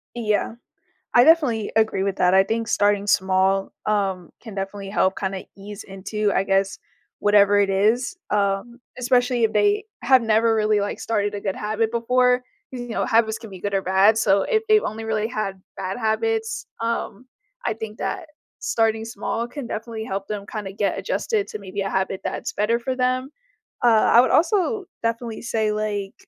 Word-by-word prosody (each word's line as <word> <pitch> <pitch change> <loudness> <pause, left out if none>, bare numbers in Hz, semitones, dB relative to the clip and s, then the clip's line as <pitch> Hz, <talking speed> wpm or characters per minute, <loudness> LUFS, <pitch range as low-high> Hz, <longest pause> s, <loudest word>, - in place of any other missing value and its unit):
Yeah. 215 -2 0 0.6
I 245 - +7
definitely 280 -9 +3
agree 220 -3 +2
with 195 -1 -1
that. 180 0 +3
I 190 0 +6
think 225 +2 -2
starting 205 -1 +2
small, 190 -1 +2
um, 195 -4 -1
can 220 -4 -10
definitely 195 0 -5
help 190 -1 +1
kinda 190 -1 -3
ease 205 +1 -9
into, 200 +2 -2
I 195 - +1
guess, 195 0 +1 0.4
whatever 205 0 +4
it 200 -1 +3
is, 220 - +1
um, 205 +4 -1 0.2
especially 245 -1 +1
if 220 - +1
they 205 - +2 0.2
have 260 -2 +5
never 225 0 +3
really, 215 -1 +2
like, 200 - -3
started 205 -2 -1
a 205 - -4
good 195 -1 -3
habit 215 +1 -1
before. 250 +2 +2 0.3
You 245 -2 -7
know, 230 - -1
habits 225 -1 +2
can 225 -2 -11
be 190 - -9
good 200 +1 -3
or 195 - +1
bad, 190 +4 +4
so 200 -3 +3
if 435 - +1
they've 430 0 +5
only 220 +1 -4
really 220 -1 -1
had 215 -5 -4 0.2
bad 190 +1 -4
habits, 445 - -1
um, 230 0 -3 0.4
I - - 0
think 220 0 -7
that 325 - -4 0.3
starting 225 -1 0
small 225 +1 -3
can 275 0 -7
definitely 220 0 -5
help 195 -2 -4
them 205 -1 -5
kinda 210 -4 -6
get 200 0 -1
adjusted 440 -3 -1
to - - -6
maybe 200 0 -6
a 195 0 -2
habit 190 0 -1
that's - - -4
better 220 +3 +1
for 255 +2 -3
them. 255 +1 0 0.5
Uh, - - +3 0.3
I 235 - +9
would 255 - +2
also 400 +4 +2 0.2
definitely 230 0 -3
say, 220 -2 0
like, 210 -2 -3
215 Hz, 180 wpm, -23 LUFS, 200-235 Hz, 0.6 s, I